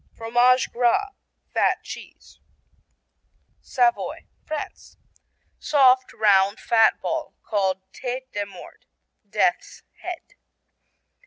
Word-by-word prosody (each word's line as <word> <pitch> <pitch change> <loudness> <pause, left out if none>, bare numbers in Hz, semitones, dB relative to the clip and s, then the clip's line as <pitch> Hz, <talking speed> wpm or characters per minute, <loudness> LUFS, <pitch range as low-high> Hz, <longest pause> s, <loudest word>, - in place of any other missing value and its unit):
Fromage 240 +2 +3
Gras 250 +13 +1 0.4
(fat - - +1
cheese) - - -11 1.2
Savoy, 245 -2 0 0.2
France 310 -1 -7 0.6
Soft, 260 -3 +4
round, 200 -1 +3
fat 225 -2 +3
ball 320 -1 -3
called 190 -3 0
tête 260 +1 -5
de 205 -1 -2
mort, 200 - -14 0.4
"death's - - 0 0.2
head." 360 -2 -7
245 Hz, 85 wpm, -24 LUFS, 215-265 Hz, 1.2 s, Soft